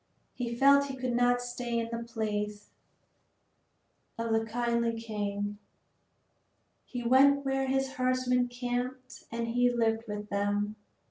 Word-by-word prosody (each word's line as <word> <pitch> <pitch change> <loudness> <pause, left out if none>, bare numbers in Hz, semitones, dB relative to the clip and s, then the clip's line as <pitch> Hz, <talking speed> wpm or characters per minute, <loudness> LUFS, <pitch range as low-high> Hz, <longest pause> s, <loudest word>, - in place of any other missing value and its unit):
He 235 -2 -3
felt 280 +2 +5
he 270 - -5
could 255 -1 -2
not 245 0 +3
stay 245 -1 -3
in 230 0 -1
the 235 0 -5
palace 210 -2 -3 1.5
of 230 0 -2
the 225 0 +2
kindly 235 0 0
king. 205 -2 -3 1.3
He 245 -1 -5
went 275 +3 +5
where 270 0 0
his 270 0 0
herdsmen 255 -1 +2
camped 245 +1 -4
and 230 0 -2
he 245 +1 +3
lived 225 -1 +1
with 210 0 -5
them. 205 +1 0
240 Hz, 130 wpm, -30 LUFS, 225-255 Hz, 1.5 s, felt